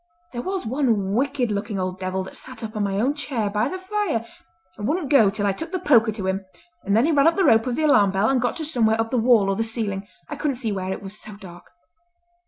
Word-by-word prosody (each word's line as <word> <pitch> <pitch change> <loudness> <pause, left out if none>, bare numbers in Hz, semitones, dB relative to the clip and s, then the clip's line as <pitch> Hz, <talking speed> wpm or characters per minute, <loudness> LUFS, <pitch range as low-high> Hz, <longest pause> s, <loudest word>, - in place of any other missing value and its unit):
There 240 - -3
was 375 0 -3
one 225 -6 0
wicked 255 -1 0
looking 205 0 -3
old 185 0 -3
devil 190 0 -2
that 185 - -10
sat 255 -3 -8
up 220 0 -6
on 210 - -1
my 195 0 -1
own 260 +6 +2
chair 250 -8 -3
by 210 +1 0
the 375 - -4
fire, 375 - -2 0.5
and 210 0 -4
wouldn't 310 -3 -1
go 225 -8 +6
till 205 +1 -2
I 200 - +3
took 325 - -6
the 375 - -1
poker 240 -11 +4
to 200 -3 -5
him, 190 +1 -1 0.4
and 200 +2 +1
then 235 - +4
he 330 - +2
ran 290 0 +4
up 330 - +4
the 385 - +2
rope 225 -4 +4
of 245 - -1
the 315 - -1
alarm 210 -10 +5
bell 195 +2 +1
and 260 -1 +2
got - - 0
to 320 - -4
somewhere 225 -7 +1
up 225 0 -1
the 250 - +2
wall 225 -4 +4
or 195 - +1
the 225 - -2
ceiling—I 220 +3 -4
couldn't 290 -2 -1
see 230 -4 -2
where, 190 -1 -3
it 190 - -5
was 195 +2 -6
so 215 -2 -8
dark." 175 -3 -12
225 Hz, 265 wpm, -23 LUFS, 200-280 Hz, 0.5 s, go